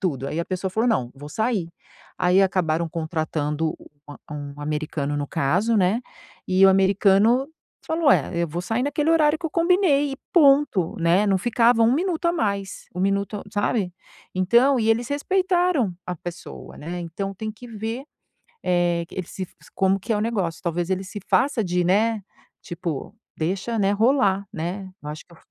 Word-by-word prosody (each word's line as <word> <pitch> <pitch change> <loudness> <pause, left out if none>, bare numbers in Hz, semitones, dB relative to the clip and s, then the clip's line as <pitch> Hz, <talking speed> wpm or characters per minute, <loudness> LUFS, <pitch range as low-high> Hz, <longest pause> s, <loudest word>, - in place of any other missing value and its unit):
tudo 140 -8 -2
aí 160 - -2
a - - -2
pessoa 185 0 -3
falou: 225 +6 +1
"Não 125 - 0
vou 145 +2 -10
sair". 215 -1 -1 0.5
Aí 180 +2 +4
acabaram 170 -3 +1
contratando 155 -1 -2
u - - -15 0.4
um 145 -1 -6
americano 150 -1 -2
no 145 0 -2
caso, 205 +14 +1
né, 195 +4 +2 0.5
e 185 +1 +5
o - - +7
americano 200 +6 +4 0.4
falou 320 -2 +2
é: - - +1
"Eu - - +1
vou 170 +3 -3
sair 225 +7 -1
naquele 290 +3 0
horário 310 -1 +4
que 345 - -18
eu - - -6
combinei 335 -5 +3
e - - -5 0.2
ponto", 280 - +4
né. 175 +5 +3
Não 195 -2 +3
ficava 235 +2 +3
1 225 +1 +5
minuto 345 +1 -1
a 340 - +3
mais, 200 - -2
1 180 - -3
minuto 200 +1 0
sabe, 205 -3 0 0.4
então 235 +9 +4
e 220 - +1
eles 235 +2 +1
respeitaram 355 - +1
a 180 - -3
pessoa, 175 +2 -9
né. 175 +4 -5
Então 195 +4 -5
tem 215 +3 -5
que 235 +3 -12
ver, 225 +4 -5 0.6
eh, 175 -1 +1
eles 185 -2 -6
se 185 -2 -5 0.3
como 190 0 +3
que 230 - -5
é - - +1
o - - -1
negócio. 200 -7 -2
Talvez 175 0 -1
ele 190 0 -1
se 205 +2 -7
faça 265 -5 +2
de, 180 -1 0
né, 215 +4 +2 0.4
tipo 170 0 -5 0.2
deixa, 195 +8 -2
né, 195 -1 +3
rolar, 205 -3 +2
né, 180 +4 -4
eu 150 - -6
acho 150 +1 -8
que 170 - -19
eu 165 - -17
195 Hz, 180 wpm, -23 LUFS, 175-235 Hz, 0.6 s, o